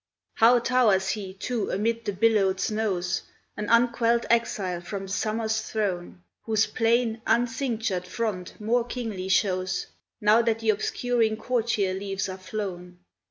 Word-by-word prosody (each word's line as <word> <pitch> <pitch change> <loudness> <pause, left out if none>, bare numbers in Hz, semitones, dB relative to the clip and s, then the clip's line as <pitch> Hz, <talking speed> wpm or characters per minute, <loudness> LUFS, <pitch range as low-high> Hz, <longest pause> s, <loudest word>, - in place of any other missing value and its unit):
How 235 +2 +6
towers 230 -6 +3
he, 200 -3 -3
too, 230 +2 -2
amid 230 +3 -1
the 205 - 0
billowed 195 -2 +2
snows, 195 -5 -1 0.3
An 210 - -4
unquelled 235 0 +3
exile 195 -6 0
from 195 +2 -5
the 195 - -8
summer's 220 +2 -1
throne, 185 -5 -3 0.2
Whose 220 -1 +2
plain, 230 -1 +1
uncinctured 230 -6 0
front 200 -4 -4
more 230 +3 +1
kingly 225 -6 -5
shows, 185 -1 +1 0.3
Now 215 +1 +5
that 230 -1 +1
the 225 -1 +2
obscuring 225 +1 0
courtier 225 -5 0
leaves 195 0 -3
are 185 0 -6
flown. 185 -2 -6
215 Hz, 135 wpm, -26 LUFS, 190-230 Hz, 0.3 s, How